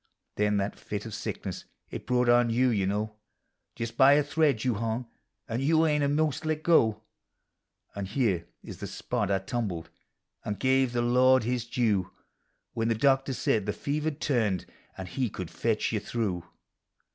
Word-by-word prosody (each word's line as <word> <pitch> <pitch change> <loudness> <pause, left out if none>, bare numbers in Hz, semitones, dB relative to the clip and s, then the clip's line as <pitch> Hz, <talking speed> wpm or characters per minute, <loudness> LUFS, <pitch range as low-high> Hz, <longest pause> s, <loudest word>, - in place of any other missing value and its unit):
Then 105 0 +1
that 100 +1 -2
tit 105 0 -5
of 110 - -7
sickness - - -5 0.3
it - - -7
brought 125 -1 +2
on 120 0 +5
you, 125 +3 +3
you 100 -5 +1
know; 105 +2 -2 0.6
Just 115 0 -5
by 135 0 +7
a 145 +1 +4
thread 145 -5 +1
you 125 -2 +2
hung, 115 +3 -2 0.4
and 115 +2 -2
you 160 +3 +3
e'en 150 -2 +2
a' 140 - +2
most 150 -1 0
let 155 0 -2
go; 110 -11 +3 0.9
And 100 -1 -4
here 100 -7 0 0.2
is - - -9
the - - -5
spot 105 - -2
I 100 - +3
tumbled, 95 -4 -4 0.5
an' 105 - -2
give 130 +1 +2
the 120 0 +1
Lord 130 +1 +4
his 120 0 -1
due, 110 -7 +1 0.6
When 115 0 -1
the 115 - +2
doctor 135 +2 +2
said 105 -4 0
the 105 - 0
fever 150 +2 -2
M 150 - -7
turned, 115 - 0 0.3
an' 95 - -5
he 125 +6 -2
could 90 -4 -7
fetch - - 0
you - - 0
through. 95 -7 -3
120 Hz, 180 wpm, -28 LUFS, 105-135 Hz, 0.9 s, by